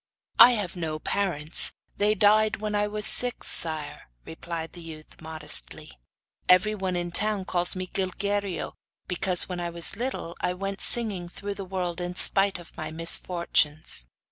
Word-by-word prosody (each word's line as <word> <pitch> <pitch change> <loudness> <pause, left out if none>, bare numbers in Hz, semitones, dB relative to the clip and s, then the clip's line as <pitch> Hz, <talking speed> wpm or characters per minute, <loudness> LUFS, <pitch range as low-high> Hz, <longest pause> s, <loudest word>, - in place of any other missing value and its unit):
'I 240 - +10
have 205 -6 -3
no 160 -3 -4
parents; 165 -3 +2 0.2
they 210 +1 +2
died 215 +1 +3
when 215 0 -4
I 205 0 0
was 210 0 -2
six, 245 -1 +3
sire,' 155 - +2 0.2
replied 165 0 -7
the 175 - -10
youth, 160 -1 -12
modestly. 155 - -3 0.6
'Everyone 190 0 +2
in 175 0 -2
the - - -2
town 210 -2 +1
calls 175 -1 -2
me 185 0 -4
Gilguerillo[FN#1], 195 +1 -3 0.4
because, 180 0 +3
when 180 -1 -5
I 175 0 -3
was 170 +2 -4
little, 230 -7 -5
I 180 - -1
went 195 +1 -5
singing 200 -7 +3
through 200 +3 -6
the 200 -1 -8
world 180 -2 -4
in 175 0 -5
spite 195 +1 +2
of 175 -1 -15
my - - -6
misfortunes. 160 - -1
180 Hz, 160 wpm, -25 LUFS, 170-205 Hz, 0.6 s, I